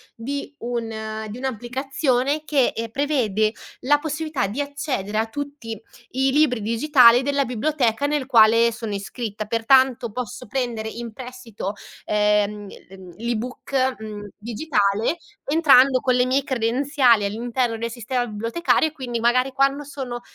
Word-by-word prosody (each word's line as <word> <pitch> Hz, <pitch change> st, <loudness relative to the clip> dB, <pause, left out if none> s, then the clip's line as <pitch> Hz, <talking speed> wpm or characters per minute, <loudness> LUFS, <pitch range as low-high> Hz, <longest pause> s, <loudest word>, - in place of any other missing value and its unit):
di 280 Hz, +5 st, -5 dB
un 220 Hz, -2 st, -4 dB
di 215 Hz, -, -7 dB
un'applicazione 265 Hz, +3 st, -1 dB
che, 280 Hz, -5 st, +2 dB
ehm, 230 Hz, 0 st, -4 dB
prevede 225 Hz, -6 st, +1 dB, 0.3 s
la 290 Hz, +3 st, +3 dB
possibilità 305 Hz, -6 st, -2 dB
di 225 Hz, +9 st, -3 dB
accedere 280 Hz, -8 st, -3 dB
a 220 Hz, +1 st, +1 dB
tutti 280 Hz, -3 st, -6 dB, 0.3 s
i 265 Hz, +1 st, +1 dB
libri 265 Hz, -5 st, +2 dB
digitale 240 Hz, +1 st, +5 dB
della 280 Hz, +1 st, +1 dB
biblioteca 250 Hz, 0 st, 0 dB
nel 290 Hz, -2 st, 0 dB
quale 230 Hz, -2 st, +5 dB
sono 225 Hz, -2 st, -5 dB
iscritta, 210 Hz, +1 st, -5 dB
pertanto 245 Hz, +2 st, +3 dB
posso 250 Hz, +1 st, -6 dB
prendere 235 Hz, -2 st, -2 dB
in 230 Hz, +1 st, -6 dB
prestito, 245 Hz, -5 st, -7 dB, 0.3 s
ehm, 210 Hz, 0 st, +1 dB
l'e 195 Hz, 0 st, -14 dB
mhmm, 185 Hz, -2 st, -12 dB
l'e-book, 250 Hz, +3 st, -2 dB
mhmm, 210 Hz, -1 st, -7 dB
digitale 225 Hz, +1 st, 0 dB, 0.3 s
entrando 275 Hz, -4 st, +5 dB
con 255 Hz, 0 st, +1 dB
le 250 Hz, 0 st, +3 dB
mie 265 Hz, +2 st, +1 dB
credenziali 250 Hz, -2 st, +2 dB
all'interno 230 Hz, +2 st, -1 dB
del 230 Hz, +1 st, -4 dB
sistema 245 Hz, +1 st, -2 dB
bibliotecario 230 Hz, +10 st, 0 dB
e -, -, -6 dB
quindi 245 Hz, -5 st, -4 dB
magari 250 Hz, +3 st, +2 dB
quando 275 Hz, +2 st, +1 dB
sono 265 Hz, -4 st, -6 dB
245 Hz, 140 wpm, -22 LUFS, 220-275 Hz, 0.3 s, digitale